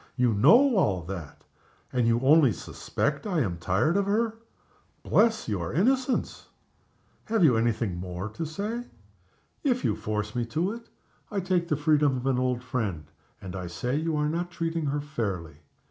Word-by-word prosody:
You 125 -3 +2
know 230 - +6
all 95 - +2
that 85 -4 -8 0.5
and 125 -2 +2
you 115 +1 +2
only 140 -1 +6
suspect 140 - -3
I 175 -6 +1
am 90 -8 -2
tired 95 - +1
of 200 -1 +1
her. 220 +2 +1 0.7
Bless 225 +1 +2
your 90 -6 -2
innocence! 255 - 0 0.8
Have 220 -4 +1
you 135 -7 +6
any 115 +1 +3
thing 110 -5 -3
more 90 +2 -5
to 135 +10 -5
say?" 210 +10 -4 0.8
"If 250 -4 +1
you 105 - +2
force 105 0 -3
me 120 - 0
to 165 - -1
it, 230 +1 -9 0.4
I 205 - -2
take 180 -2 0
the 150 - 0
freedom 150 -2 +3
of 125 - -5
an 130 -2 +2
old 125 -1 0
friend, 110 -11 -3 0.3
and 95 -1 -8
I 90 -2 -5
say 125 +9 -3
you 160 +1 -1
are 150 0 +1
not 170 +3 -2
treating 165 -2 -2
her 145 +1 -1
fairly. 100 - -4
140 Hz, 175 wpm, -27 LUFS, 105-175 Hz, 0.8 s, know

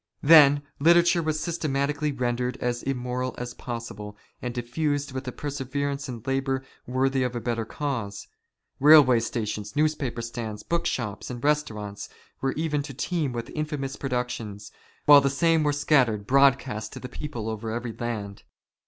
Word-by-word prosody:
Then 145 -2 +7 0.2
literature 170 +3 +5
was 155 -1 -1
systematically 150 -3 -1
rendered 125 -1 -1
as 120 -1 -2
immoral 125 -1 -3
as 120 0 -5
possible,, 110 -4 -7 0.2
and 125 - -3
diffused 140 +4 -2
with 130 0 -5
a - - -2
perseverance 140 0 -3
and 120 -2 -7
labour 135 0 -1 0.2
worthy 130 +1 +1
of 125 -1 -1
a - - -1
better 115 0 -2
cause. 115 -7 -4 0.5
Kailway 140 -5 +7
stations, 105 -2 -4
newspaper 145 -6 0
stands, 115 -3 -5
book 170 0 -1
shops, 105 -5 -3
and 120 -1 -7
restaurants, 110 -9 -1 0.3
were 135 0 0
made 150 -2 0
to 135 -4 -8
teem 155 -1 -1
with 115 -1 -5
infamous 150 -3 -3
produc 125 -2 -2
tions, 105 -4 -7 0.3
while 145 -1 +9
the 140 - +2
same 165 +3 +2
were 150 -1 +2
scattered 135 -8 +2
broadcast 135 -4 +2
to - - -7
the 125 - -7
people 125 -4 -6
over 110 0 -4
every 120 +1 -4
land. 105 -5 -5
130 Hz, 155 wpm, -26 LUFS, 120-145 Hz, 0.5 s, while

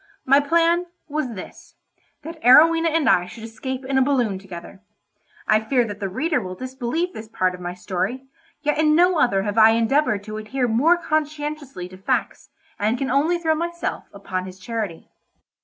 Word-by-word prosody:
My 275 +2 +6
plan 335 +4 +2 0.2
was 290 -6 -3
this—that 315 - -13
Arowhena 330 +6 +6
and 320 -4 +1
I 180 -5 +3
should 220 +5 -11
escape 255 +4 -6
in 265 0 +1
a - - +3
balloon 245 -8 +1
together. 190 0 -11 0.7
I 215 - +4
fear 240 +3 +1
that 205 -2 -7
the 195 - -3
reader 310 - 0
will 185 -2 -6
disbelieve 260 - -3
this 220 - -8
part 185 -4 0
of 180 - -9
my 175 0 -5
story, 195 +7 -3 0.4
yet 295 0 0
in 305 -1 +4
no 355 0 +4
other 195 -8 +2
have 210 +2 0
I 220 0 +7
endeavoured 230 -2 +1
to 215 +1 -7
adhere 245 +4 -2
more 280 +10 +3
conscientiously 300 - -3
to 185 - -12
facts, 190 - -2 0.3
and 215 +4 +1
can 265 0 -2
only 305 +6 +2
throw 325 -2 +1
myself 340 +2 -3
upon 185 -2 -5
his 185 0 -10
charity. 210 -4 -5
250 Hz, 175 wpm, -22 LUFS, 205-305 Hz, 0.7 s, I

